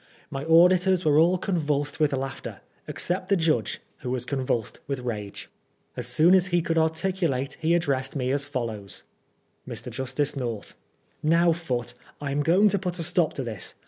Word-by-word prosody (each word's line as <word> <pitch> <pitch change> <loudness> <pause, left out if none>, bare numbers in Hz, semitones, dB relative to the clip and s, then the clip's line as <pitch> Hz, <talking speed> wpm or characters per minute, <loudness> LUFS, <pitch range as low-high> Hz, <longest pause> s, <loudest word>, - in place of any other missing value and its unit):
My 135 0 -4
auditors 180 +2 +5
were 150 0 +5
all 175 +3 +4
convulsed 150 -6 -1
with 150 -2 +3
laughter, 135 0 -4 0.3
except 185 +1 -2
the 200 - +4
judge, 155 - +1 0.2
who 125 - -5
was 125 -1 -2
convulsed 130 -5 -2
with 135 -2 -3
rage. 105 -5 -5 0.5
As 125 -1 -3
soon 155 +8 +4
as 190 -1 +5
he 175 -2 +1
could 165 0 +1
articulate 160 -4 0
he 165 +2 +3
addressed 140 -5 -1
me 130 -2 0
as 140 +1 +2
follows: 115 - -5 0.2
— - - -44
" - - -40
Mr. - - -6
Justice 135 +3 -1
North: 120 -6 -4 0.5
Now, 170 +2 +4
Foote, 125 -8 -3 0.3
I 145 -1 -3
am 145 +1 0
going 180 +8 +4
to 200 0 +1
put 180 -1 -3
a 165 - -3
stop 175 -1 +1
to 135 - -3
this. 110 -5 -4
145 Hz, 180 wpm, -26 LUFS, 130-170 Hz, 0.5 s, auditors